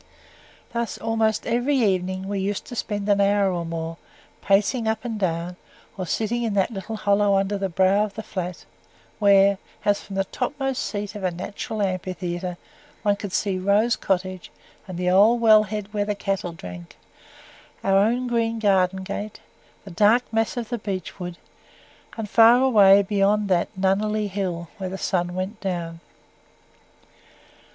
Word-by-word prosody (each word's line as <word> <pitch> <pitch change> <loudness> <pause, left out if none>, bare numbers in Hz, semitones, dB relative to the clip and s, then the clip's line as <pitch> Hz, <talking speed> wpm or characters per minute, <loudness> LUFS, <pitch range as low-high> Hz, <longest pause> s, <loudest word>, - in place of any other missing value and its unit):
Thus, 235 -1 -2
almost 225 -1 0
every 245 +4 +1
evening, 190 -4 0
we 200 0 -2
used 195 +1 -2
to 245 - -8
spend 205 -3 -3
an 200 -1 +3
hour 200 -1 +3
or 170 -1 -2
more, 165 0 -5 0.4
pacing 210 +4 +2
up 220 +2 -1
and 225 -3 -3
down, 175 -1 -2 0.4
or 185 -2 -5
sitting 225 +6 -1
in 225 -3 -1
that 195 +3 +2
little 220 +1 -5
hollow 205 -1 +2
under 195 +1 0
the 195 -1 -2
brow 190 +4 +3
of 200 -2 -10
the 220 - -5
Flat, 180 -3 -5 0.5
where, 200 -1 +5 0.3
as 205 0 +2
from 195 - -9
the 195 - +1
topmost 270 +5 -3
seat 205 -1 -4
of 205 -2 -8
a 185 - +2
natural 200 +4 -4
amphitheatre, 180 -1 -3 0.5
one 205 -1 +3
could 200 -1 -7
see 190 -1 -1
Rose 205 +5 +2
Cottage 185 -1 -2 0.4
and 185 -2 -6
the 180 0 +1
old 210 +6 +5
well 220 -2 +7
head 210 0 -5
where 205 -1 0
the 210 0 -2
cattle 195 -3 -2
drank; 90 - -10 0.9
our 195 0 +3
own 235 +5 +2
green 230 -1 0
garden 190 -3 +2
gate, 205 +2 -5 0.5
the 195 - -9
dark 215 +7 +4
mass 225 +2 0
of 235 -2 -4
the 240 -1 -3
beech 195 -3 -5
wood, 175 -1 -6 0.8
and 220 -2 -4
far 230 +3 +7
away 200 -6 +6
beyond 205 +1 +1
that 175 -2 +2
Nunneley 210 +3 +1
Hill, 180 -3 -3
where 190 -1 -3
the 190 - -5
sun 175 -2 -1
went 190 +4 -4
down. 170 -4 -4
200 Hz, 165 wpm, -23 LUFS, 185-215 Hz, 0.9 s, well